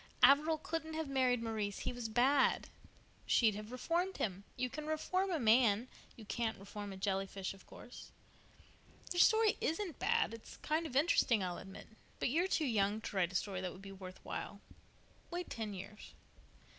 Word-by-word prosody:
"Averil 295 Hz, +5 st, +6 dB
couldn't 320 Hz, -1 st, -4 dB
have 320 Hz, -1 st, -2 dB
married 255 Hz, -3 st, +2 dB
Maurice. 215 Hz, -3 st, -2 dB
He -, -, -2 dB
was 240 Hz, -2 st, -4 dB
bad." 260 Hz, +5 st, +3 dB, 0.6 s
"She'd 225 Hz, -3 st, +4 dB
have 210 Hz, +2 st, -7 dB
reformed 340 Hz, +9 st, -1 dB
him. 195 Hz, -1 st, -2 dB
You 250 Hz, 0 st, -1 dB
can 300 Hz, +4 st, -6 dB
reform 370 Hz, +5 st, 0 dB
a 345 Hz, -, +1 dB
man; 230 Hz, 0 st, +4 dB, 0.3 s
you 225 Hz, -, -11 dB
can't 225 Hz, +1 st, -2 dB
reform 200 Hz, +1 st, -7 dB
a 190 Hz, -, -7 dB
jelly 195 Hz, 0 st, 0 dB
fish, 195 Hz, 0 st, -4 dB
of 195 Hz, -, -17 dB
course. 245 Hz, -, -11 dB, 1.0 s
Your 350 Hz, -, 0 dB
story 440 Hz, 0 st, +5 dB
isn't 330 Hz, +1 st, -2 dB
bad—it's 230 Hz, 0 st, 0 dB
kind 320 Hz, +2 st, 0 dB
of 260 Hz, -, -9 dB
interesting, 260 Hz, -, +4 dB
I'll 180 Hz, -1 st, -3 dB
admit. 190 Hz, 0 st, -10 dB, 0.3 s
But -, -, 0 dB
you're 335 Hz, +8 st, +2 dB
too 320 Hz, -4 st, +1 dB
young 210 Hz, -4 st, +1 dB
to 210 Hz, -, -6 dB
write 180 Hz, -2 st, +2 dB
a -, -, -9 dB
story 190 Hz, 0 st, -1 dB
that 185 Hz, -1 st, -3 dB
would 190 Hz, -, -13 dB
be 195 Hz, -, -8 dB
worth 190 Hz, -1 st, -9 dB
while. 200 Hz, -, -5 dB, 0.7 s
Wait 355 Hz, 0 st, -5 dB
ten 220 Hz, -2 st, -3 dB
years." 200 Hz, +2 st, -9 dB
235 Hz, 180 wpm, -35 LUFS, 200-310 Hz, 1.0 s, Averil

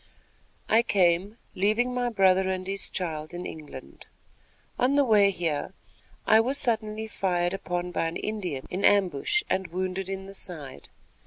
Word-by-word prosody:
I 225 Hz, +1 st, +5 dB
came, 195 Hz, -1 st, +2 dB, 0.2 s
leaving 215 Hz, +6 st, +1 dB
my 245 Hz, -1 st, 0 dB
brother 190 Hz, -3 st, +3 dB
and 185 Hz, 0 st, -2 dB
his 195 Hz, +1 st, -3 dB
child 160 Hz, -3 st, -4 dB
in 175 Hz, -, -5 dB
England. 155 Hz, -2 st, -10 dB, 0.7 s
On 255 Hz, +3 st, +3 dB
the 285 Hz, -1 st, +4 dB
way 210 Hz, -4 st, +5 dB
here, 175 Hz, -1 st, -2 dB, 0.5 s
I 220 Hz, -, +6 dB
was 260 Hz, +5 st, +1 dB
suddenly 220 Hz, -4 st, -1 dB
fired 180 Hz, -4 st, -1 dB
upon 180 Hz, -2 st, -3 dB
by 165 Hz, -, 0 dB
an 165 Hz, -, -4 dB
Indian 185 Hz, -11 st, -4 dB
in 185 Hz, +2 st, -3 dB
ambush 200 Hz, -, +3 dB
and 190 Hz, -1 st, -1 dB
wounded 185 Hz, +2 st, -3 dB
in 190 Hz, 0 st, -4 dB
the 195 Hz, -, -10 dB
side. 155 Hz, -9 st, -5 dB
190 Hz, 155 wpm, -27 LUFS, 175-215 Hz, 0.7 s, I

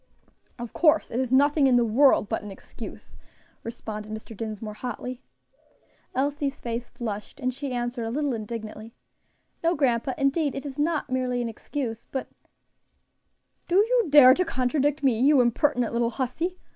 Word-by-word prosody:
"Of 240 Hz, -2 st, -7 dB
course 320 Hz, -1 st, +3 dB
it 235 Hz, -, -1 dB
is; 260 Hz, -2 st, -1 dB
nothing 285 Hz, +2 st, +4 dB
in 255 Hz, -, +4 dB
the 240 Hz, -1 st, +4 dB
world 235 Hz, 0 st, +4 dB
but 220 Hz, -, -2 dB
an 210 Hz, -, -8 dB
excuse," 195 Hz, -, -10 dB, 0.5 s
responded 215 Hz, -2 st, -7 dB
Mr. 220 Hz, +1 st, -7 dB
Dinsmore, 215 Hz, 0 st, -5 dB
hotly. 250 Hz, +2 st, -6 dB, 0.9 s
Elsie's 285 Hz, +1 st, -1 dB
face 235 Hz, 0 st, -4 dB
flushed, 215 Hz, +2 st, -6 dB
and 255 Hz, -1 st, -1 dB
she 275 Hz, +1 st, -5 dB
answered 240 Hz, -1 st, -2 dB
a -, -, -3 dB
little 285 Hz, +2 st, -1 dB
indignantly, 220 Hz, 0 st, -7 dB, 0.7 s
"No, 335 Hz, +1 st, +2 dB
grandpa, 255 Hz, -2 st, +1 dB
indeed 280 Hz, +1 st, +1 dB
it 275 Hz, -, -5 dB
is 275 Hz, 0 st, -7 dB
not 300 Hz, -2 st, 0 dB
merely 255 Hz, -1 st, 0 dB
an 240 Hz, -1 st, -2 dB
excuse, 230 Hz, 0 st, -5 dB
but 265 Hz, -, -4 dB, 0.7 s
" -, -, -45 dB
"Do 350 Hz, -, 0 dB
you 455 Hz, +2 st, +4 dB
dare 280 Hz, -3 st, +9 dB
to 365 Hz, -, +1 dB
contradict 290 Hz, 0 st, 0 dB
me, 250 Hz, -5 st, +3 dB
you 280 Hz, +2 st, +5 dB
impertinent 245 Hz, 0 st, +2 dB
little 235 Hz, 0 st, +1 dB
hussy?" 275 Hz, +9 st, -3 dB
255 Hz, 160 wpm, -26 LUFS, 230-285 Hz, 0.9 s, dare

